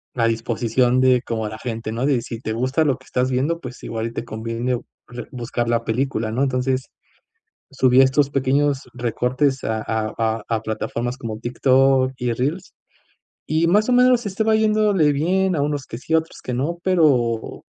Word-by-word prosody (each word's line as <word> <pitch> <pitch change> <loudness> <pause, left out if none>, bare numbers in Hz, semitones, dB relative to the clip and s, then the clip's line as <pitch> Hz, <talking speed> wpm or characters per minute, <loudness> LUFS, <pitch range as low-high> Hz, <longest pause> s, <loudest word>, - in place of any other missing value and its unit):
a 115 -2 +2
disposición 120 +2 +1
de 130 -2 +4
como 115 -3 -3
a - - -3
la 110 - -7
gente, 115 -2 -4
¿no?, 120 +4 -1
de: 135 -5 +2
"Si 115 -1 -7
te 110 - -3
gusta 130 +7 +1
lo 135 -4 +1
que 130 - -21
estás 130 +1 -1
viendo 150 +7 0
pues 125 -1 -9
igual 115 0 -3
y - - -7
te 115 - -4
conviene 115 +2 -3 0.3
re 120 0 -8
buscar 120 -1 -3
la 115 0 0
película", 115 -1 -1
¿no?, 125 +4 0
entonces 130 -1 -1 0.8
subí 130 -1 +4
estos 135 +1 +3
pequeños 140 +1 +1
recortes 125 +3 0
a 110 -1 -1
a 110 0 -1
a 115 -2 0
plataformas 115 +3 -3
como 110 -3 -5
TikTok 130 +2 +3
y 125 -2 -1
Reels 150 +10 -3 0.7
y 160 +2 +1
más 210 +7 +3
o - - +4
menos 250 -2 +4
estaba 220 +3 +1
yéndole 210 -7 +3
bien 185 +5 +1
a 145 - +1
unos 145 -2 -2
que 115 - -7
sí, 160 +6 -1
otros 160 0 -1
que 125 - -4
no, 155 +8 -2
pero 135 -11 +1
130 Hz, 180 wpm, -21 LUFS, 115-145 Hz, 0.8 s, de